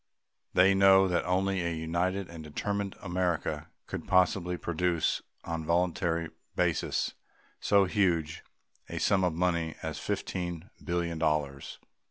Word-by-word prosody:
They 95 +2 +6
know 95 0 +6
that 90 -2 +1
only 95 +1 +1
a 85 - -1
united 85 +4 -1
and 85 -2 -9
determined 100 +6 -3
America 90 -2 -1 0.2
could - - -6
possibly 90 -1 +2
produce 85 -1 0 0.2
on 85 -1 -3
a - - -8
voluntary 85 -1 +1 0.3
basis - - 0 0.5
so 100 -1 +4
huge 90 -6 +1 0.5
a - - -5
sum 95 -1 +2
of 90 -2 +2
money 85 -1 0
as 80 -2 -4
fifteen 85 -1 -3
billion 85 -2 -1
dollars. 75 -3 -1
85 Hz, 130 wpm, -30 LUFS, 80-95 Hz, 0.5 s, They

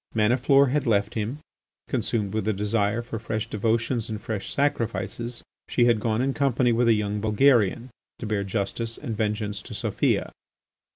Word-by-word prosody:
Maniflore 130 +5 +4
had 145 0 0
left 105 -1 +2
him. 110 +5 -3 0.5
Consumed 105 -4 -1
with 110 -1 -1
a 110 - +2
desire 105 +2 0
for 115 -2 -5
fresh 110 -1 -3
devotions 115 +2 0
and 110 -1 -4
fresh 105 -2 -4
sacrifices, 120 -3 -2 0.3
she 120 - +3
had 120 -2 +4
gone 110 +2 0
in 135 0 0
company 130 -3 +2
with 120 +1 +2
a 115 - +6
young 105 -1 -1
Bulgarian 115 +1 +3 0.3
to - - -6
bear 105 -2 -1
justice 110 +3 -3
and 115 - -5
vengeance 105 -1 -2
to - - -9
Sofia. - - 0
110 Hz, 165 wpm, -25 LUFS, 105-120 Hz, 0.5 s, a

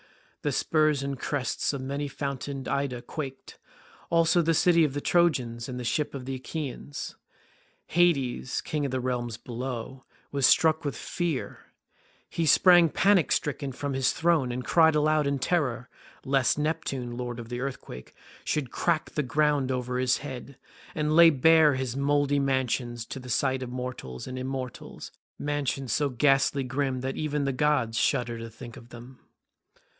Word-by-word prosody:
The - - -1
spurs 155 -3 +2
and 140 -1 -4
crests 140 -2 -1
of 140 - -4
many 140 +2 -3
fountained 140 -1 -5
Ida 130 -4 -2
quaked, 135 -1 -7
as - - -19 0.5
also 165 +1 +4
the 165 0 +2
city 170 0 +4
of 145 -3 0
the - - 0
Trojans 130 -9 +1
and 125 -1 -5
the - - -5
ships 145 +5 -1
of 130 -2 -6
the 135 - -4
Achaeans. 140 +1 -6 0.7
Hades, 140 -8 +1
king 150 -1 -3
of 140 - -1
the 130 0 -2
realms 120 -2 -2
below, 125 +2 -6 0.3
was 140 -2 +3
struck 160 0 +4
with 145 - -3
fear; 170 -6 -3 0.7
he 165 -1 -2
sprang 175 +2 +6
panic 195 +1 +3
stricken 140 -1 -1
from 140 +2 -4
his 130 -1 +2
throne 160 -7 +1
and 125 0 -4
cried 160 +1 +4
aloud 150 0 +2
in 140 0 0
terror 130 -4 -1 0.4
lest 135 -1 +2
Neptune, 140 -5 -2
lord 120 -1 -5
of 115 -1 -8
the 120 0 -4
earthquake, 130 - -7 0.3
should 140 -5 -2
crack 170 -3 0
the 150 - -1
ground 145 -1 +1
over 125 0 -2
his 130 0 +2
head, 135 -1 -8 0.4
and 150 0 0
lay 170 0 +9
bare 155 0 +5
his 130 -2 -3
mouldy 145 0 +2
mansions 125 -3 -1
to 135 - -7
the 125 0 -10
sight 130 +1 +1
of 130 - -5
mortals 125 - -6
and 130 0 -6
immortals—mansions 135 +1 -4
so 145 -1 +1
ghastly 135 +2 +2
grim 130 0 -2
that 130 +1 -3
even 150 -2 -1
the 135 - 0
gods 125 -5 +1
shudder 120 -4 0
to 115 0 -7
think 115 +1 -11
of 120 - -13
them. 120 +2 -12
135 Hz, 165 wpm, -27 LUFS, 125-150 Hz, 0.7 s, lay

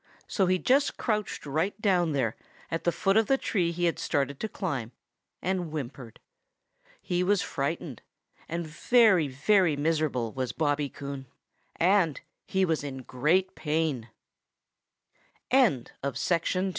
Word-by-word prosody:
So 190 -3 +1
he 185 0 +3
just 270 +9 +2
crouched 215 -8 -2
right 160 +8 -1
down 180 -7 +2
there 125 -6 0 0.4
at 165 - -3
the 175 - +4
foot 195 +3 +1
of 220 -1 +3
the 270 - +3
tree 180 -9 0
he 175 +1 -1
had 170 - 0
started 140 -1 -1
to 220 - -3
climb, 135 - -3 0.5
and 180 -2 -1
whimpered. 135 -5 -7 0.8
He 180 -2 0
was 195 0 +2
frightened 140 -2 -3 0.5
and 170 +1 -2
very, 190 +1 +4
very 160 +5 +3
miserable, 145 -6 0
was 130 -2 -3
Bobby 145 -2 0
Coon, 140 -1 -7 0.5
and 175 -5 +3 0.3
he 190 0 +2
was 160 -4 0
in 135 -2 -6
great 160 +11 +1
pa 150 -6 -1
165 Hz, 130 wpm, -28 LUFS, 140-190 Hz, 0.8 s, the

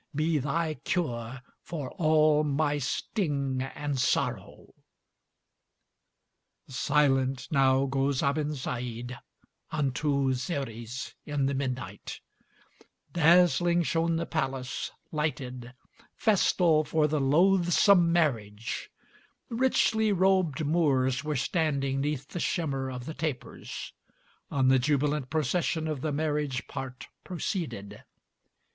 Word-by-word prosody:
be 155 +1 +1
thy 155 +4 -1
cure 130 - -2 0.2
for 145 -6 -6
all 155 -3 +3
my 145 0 0
sting 140 - -1
and 140 +1 -3
sorrow!" 130 - -1 1.9
Silent 135 0 +1
now 135 -2 +4
goes 135 0 0
Abensaïd, 125 -4 -2 0.5
unto 140 -2 0
Xeres, 125 -3 -4
in 145 -2 -1
the 140 - 0
midnight; 130 -7 -4 0.9
Dazzling 175 +1 +4
shone 165 +1 +1
the 165 +1 -1
palace, 135 -6 -3 0.2
lighted, 130 -5 -3 0.4
festal 175 -7 +3
for 150 +1 +1
the 150 -1 0
loathsome 175 +4 +4
marriage, 115 -10 -1 0.6
Richly 230 -3 +2
robed 185 -5 +2
Moors 140 -4 +2
were 150 -1 -2
standing 140 -2 0
'neath 140 -2 -2
the 175 - -5
shimmer 140 -7 -1
of 125 -1 -6
the 160 - -5
tapers, 155 -5 -5 0.6
On 135 -2 +1
the 130 0 +5
jubilant 145 0 0
procession 160 +2 0
of 150 -4 -3
the 155 - -1
marriage 145 -3 -1
part 130 -1 -7 0.2
proceeded. 170 - -4
145 Hz, 100 wpm, -28 LUFS, 130-160 Hz, 1.9 s, the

